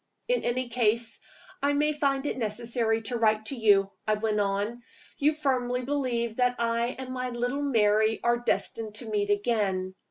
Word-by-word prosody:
"In - - +1
any 245 +1 -1
case, 230 -1 +1 0.4
I 285 +1 +2
may 300 +1 +2
find 275 -2 0
it - - -1
necessary 225 0 -1
to 240 +3 -2
write 215 -1 +2
to 275 - -2
you," 200 -4 +4 0.2
I 215 - +3
went 210 0 0
on. 205 +4 -1 0.4
"You 295 +2 +3
firmly 250 -4 0
believe 240 -5 -1
that 250 0 +2
I 235 +1 0
and 260 -1 -6
my 255 0 -3
little 245 +3 -2
Mary 220 -5 +3
are 240 0 +2
destined 225 -2 -2
to 220 +1 -6
meet 205 -1 0
again. 205 -3 0
235 Hz, 170 wpm, -27 LUFS, 215-255 Hz, 0.4 s, you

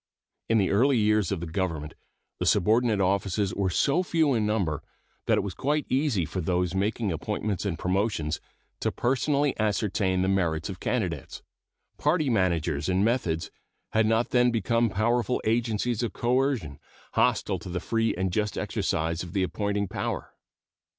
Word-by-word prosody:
In 115 - +4
the 95 -3 +2
earlier 130 +6 +4
years 105 -3 +2
of 95 -4 -2
the - - -3
Government 80 -3 -3 0.5
the - - -1
subordinate 110 +2 +3
offices 100 +1 +1
were 100 -2 0
so 140 - +2
few 160 -5 +2
in 110 -3 +1
number 95 -9 0 0.5
that - - +4
it - - +1
was 100 -2 -4
quite 145 - 0
easy 130 - +1
for 95 - -4
those 90 +1 0
making 105 +2 0
appointments 100 +5 -2
and 85 -4 -2
promotions 90 -5 -1 0.4
to - - 0
personally 140 +3 +1
ascertain 100 -3 +1
the - - +1
merits 85 -5 0
of - - -6
candidates. - - -3 0.6
Party 150 -2 +2
managers 85 -7 +1
and 95 +2 +2
methods 100 -9 0 0.4
had 110 0 +3
not 115 +2 +1
then 125 -1 +4
become 115 0 +1
powerful 115 +4 +1
agencies 115 0 0
of 120 - -2
coercion, 125 - 0 0.3
hostile - - +1
to - - -9
the 90 +1 -2
free 115 +4 0
and 95 0 -1
just 105 0 -1
exercise 80 +1 -1
of 90 -2 -7
the 95 - +1
appointing 100 +1 -1
power. - - -4
105 Hz, 160 wpm, -27 LUFS, 90-120 Hz, 0.6 s, In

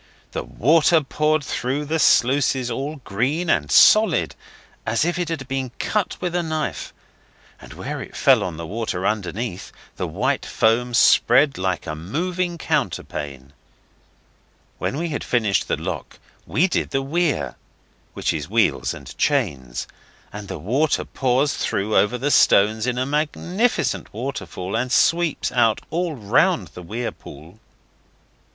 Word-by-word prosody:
The - - -3
water 160 +5 +3
poured 150 +2 0
through 135 +3 -2
the 160 +2 -1
sluices 130 -2 +3
all 140 +6 -3
green 140 - 0
and 75 -5 0
solid, - - +5 0.5
as 115 +6 0
if 175 +1 -1
it 175 -2 -2
had 150 -6 -4
been 135 -1 -2
cut 210 -4 -1
with 180 -1 -3
a 175 - +1
knife, 155 -2 -3 0.7
and - - -12
where - - -5
it - - -10
fell - - +4
on 85 -3 -5
the 85 - -6
water 95 -1 -3
underneath 105 -1 -3 0.3
the - - -2
white - - -1
foam 120 +2 +1
spread 135 +3 +4
like 95 -1 -1
a 75 - -4
moving 170 - -3
counterpane. 70 - -3 1.3
When 135 - -2
we 170 +2 -2
had 145 - -3
finished 110 -5 +1
the - - 0
lock - - -6 0.3
we 175 +6 +2
did 175 - -1
the 135 - -1
weir 160 +1 0 0.6
which - - 0
is - - -5
wheels - - +1
and - - -11
chains 70 - 0 0.5
and 105 0 -7
the - - -5
water 130 - 0
pours 135 +2 +1
through 105 +2 -1
over 120 +4 +3
the 140 +4 -1
stones 110 +1 +4
in 125 -1 -1
a 130 - 0
magnificent 165 - -1
waterfall 105 -6 -5
and 125 0 -1
sweeps 165 +2 +2
out 115 -3 +3
all 170 -1 -1
round 115 - +1
the 85 +5 -11
weir 110 +8 -4
pool. 80 +9 -14
130 Hz, 145 wpm, -22 LUFS, 105-155 Hz, 1.3 s, solid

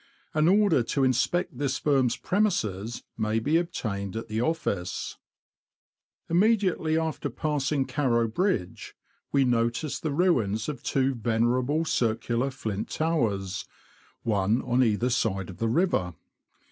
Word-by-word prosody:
An 155 +1 +3
order 195 -6 +4
to 135 +4 0
inspect 130 +3 +1
this 140 -2 0
firm's 135 -5 +2
premises 115 - -1 0.2
may 110 0 +1
be 145 +9 +2
obtained 105 - -3
at 115 - -5
the 110 +1 -1
office. 100 - -2 1.1
Immediately 185 -4 +2
after 160 -1 -2
passing 145 -2 -1
Carrow 120 -6 +1
Bridge, 115 - -2 0.4
we 140 -1 +4
notice 120 +4 0
the 155 - -2
ruins 120 - +1
of 150 - -4
two 135 0 +1
venerable 125 +6 +1
circular 120 +1 0
flint 110 -7 -4
towers, 105 - -1 0.6
one 105 +2 +1
on 125 +2 +2
either 115 +2 +1
side 95 -7 0
of 90 - -12
the 115 - 0
river. 115 - +1
125 Hz, 125 wpm, -27 LUFS, 110-155 Hz, 1.1 s, order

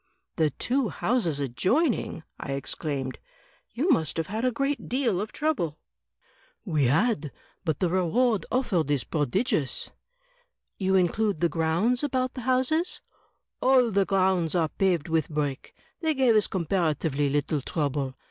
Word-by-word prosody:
"The 155 -2 +2
two 250 - -1
houses 195 - 0
adjoining!" 185 - 0 0.2
I 140 - -4
exclaimed; 135 -1 -3 0.5
"you 310 +9 0
must 160 - +1
have 165 - 0
had 215 +7 -4
a 255 - +2
great 275 +4 -2
deal 240 -7 +1
of 210 - -5
trouble." 260 - -1 0.9
"We 155 -8 +1
had; 155 - +1 0.3
but 160 -6 -1
the 185 - +1
reward 210 +5 +2
offered 200 - +1
is 145 -3 +1
prodigious." 150 - -1 0.9
"You 190 -1 +2
include 190 +1 +1
the 170 - +2
grotmds 170 - +1
about 255 -2 0
the 255 - -6
houses?" 260 +7 +1 0.6
"All 255 -3 +4
the 195 -1 +2
grounds 185 -4 +1
are 165 -3 +2
paved 175 -5 0
with 160 -2 0
brick. 145 -3 -3 0.2
They 320 -2 0
gave 255 -4 +4
us 215 - +3
compara 170 -3 0
tively 145 -1 -1
little 145 +1 0
trouble. 140 -2 -2
185 Hz, 145 wpm, -27 LUFS, 150-245 Hz, 0.9 s, All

